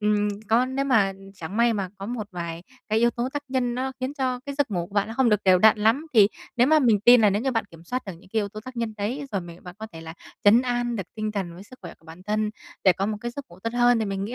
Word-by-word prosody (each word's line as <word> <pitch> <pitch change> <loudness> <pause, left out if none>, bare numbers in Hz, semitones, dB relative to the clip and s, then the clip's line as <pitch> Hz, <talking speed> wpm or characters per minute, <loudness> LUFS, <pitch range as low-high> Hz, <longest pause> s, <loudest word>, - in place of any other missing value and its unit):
ừm, 210 0 +2 0.2
có 235 +3 +4
nếu 265 +1 -2
mà 220 -8 +3 0.2
chẳng 190 +2 -7
may 235 0 +4
mà 200 -4 -2
có 195 - -6
một 235 -3 -4
vài 170 -1 -6 0.3
cái 215 0 +2
yếu 235 +1 +4
tố 240 +1 -3
tác 290 - -3
nhân 250 -2 0
nó 265 +1 -2
khiến 260 +2 -3
cho 255 -3 -1
cái 280 - -4
giấc 280 -3 0
ngủ 175 -4 -2
của 195 - -17
bạn 205 0 +1
nó 225 - -6
không 260 0 +3
được 210 -2 +3
đều 185 -1 +6
đặn 215 +3 +6
lắm, 230 +9 +2
thì 205 -3 +7 0.3
nếu 245 - +5
mà 310 +2 +5
mình 230 -8 +3
tin 240 +3 +7
là 210 -2 +5
nếu 205 +3 0
như 265 - +1
bạn 225 -3 0
kiểm 165 -1 -15
soát 255 +7 -3
được 195 - -5
những 170 +3 -17
cái 225 - +1
yếu 205 - -2
tố 215 +1 -9
tác 255 -1 -9
nhân 230 -2 -2
đấy, 240 +8 -3
rồi 195 - 0
mình 170 0 -12
bạn 180 -1 -9
có 220 - -6
thể 165 - -9
là 160 0 -9 0.3
trấn 225 +5 +6
an 240 -1 -1
được 200 - -2
tinh 215 -1 -3
thần 190 -5 -4
với 180 - -11
sức 255 +5 -15
khỏe - - -8
của - - -28
bản 165 +3 -12
thân 210 +2 -1 0.3
để 190 - +7
có 195 +3 -2
một 215 - -2
cái 240 +1 -4
giấc 280 +3 -7
ngủ 175 - -16
tốt 230 - -3
hơn, 240 0 +4
thì 220 - 0
mình 195 -1 -3
nghĩ 235 - -5
220 Hz, 320 wpm, -25 LUFS, 195-245 Hz, 0.3 s, thì